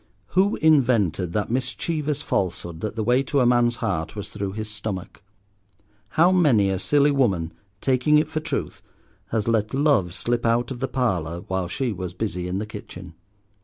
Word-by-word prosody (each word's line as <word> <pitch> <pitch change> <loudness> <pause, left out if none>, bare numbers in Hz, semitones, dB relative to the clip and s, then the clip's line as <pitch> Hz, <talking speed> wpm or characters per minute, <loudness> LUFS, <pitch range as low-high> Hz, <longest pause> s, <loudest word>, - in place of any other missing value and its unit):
Who 195 +3 +2
invented 120 - +3
that 105 +1 -1
mischievous 145 +4 -2
falsehood 85 - -2
that 110 0 -3
the 110 - -1
way 125 +4 +3
to 140 +1 0
a 125 - +4
man's 120 0 +3
heart 80 +4 -2
was 105 - -6
through 100 -2 -4
his 110 +1 -4
stomach? 105 -3 -6 1.0
How 170 +3 +6
many 130 - +4
a 95 - -1
silly 145 +6 +3
woman, 95 -12 +1 0.3
taking 135 +3 +3
it 150 0 +2
for 155 0 -3
truth, 155 - -4 0.5
has 110 -1 -1
let 110 0 +1
love 135 - +2
slip 120 0 -1
out 120 +2 +1
of 125 - -5
the 135 - -1
parlour, 90 -11 -1
while 95 -1 -2
she 120 +6 -2
was 90 -2 -6
busy 90 -3 -3
in 90 +1 -2
the 105 - -2
kitchen. 90 -4 -10
115 Hz, 175 wpm, -24 LUFS, 95-135 Hz, 1.0 s, How